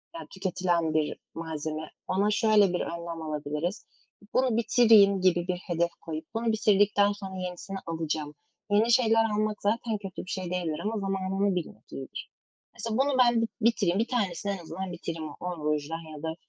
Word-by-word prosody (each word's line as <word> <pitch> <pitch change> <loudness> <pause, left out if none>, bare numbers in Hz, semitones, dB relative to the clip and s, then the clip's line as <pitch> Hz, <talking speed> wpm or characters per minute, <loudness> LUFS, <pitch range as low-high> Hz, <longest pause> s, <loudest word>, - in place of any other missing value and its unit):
yani, 330 - -7
tüketilen 180 -4 0
bir 155 -1 0 0.2
malzeme. 155 -1 -5 0.2
Ona 200 +3 +2
şöyle 210 -3 +4
bir 180 - 0
önlem 170 -1 -5
alabiliriz: 155 +4 -3 0.5
“Bunu 255 -3 +2
bitireyim.” 220 -5 +6
gibi 175 -1 +3
bir 180 -1 0
hedef 170 -2 -1
koyup 160 -1 -5
“Bunu 230 +1 -1
bitirdikten 205 -1 +4
sonra 195 -2 -7
yenisini 185 +1 -5
alacağım.” 155 -2 -3 0.3
Yeni 215 +3 +4
şeyler 225 -2 +5
almak 210 0 -1
zaten 220 +1 0
kötü 195 -2 -7
bir - - -11
şey 185 -2 -3
değildir. 170 -4 -2
Ama 220 +2 -1
zamanını 195 0 0
bilmek 155 -10 -6
iyidir." 135 - -7 0.4
Mesela, 230 -1 -3
"Bunu 270 0 +2
ben 240 -2 +5 0.2
bitireyim, 210 -4 +2
1 230 - +1
tanesini 200 -5 -1
en - - -4
azından 180 +2 -6
bitireyim, 165 -2 -5
10 175 -4 -5
rujdan 155 +1 -2
ya 145 - -11
da, 160 0 -2
185 Hz, 165 wpm, -28 LUFS, 165-210 Hz, 0.5 s, bitireyim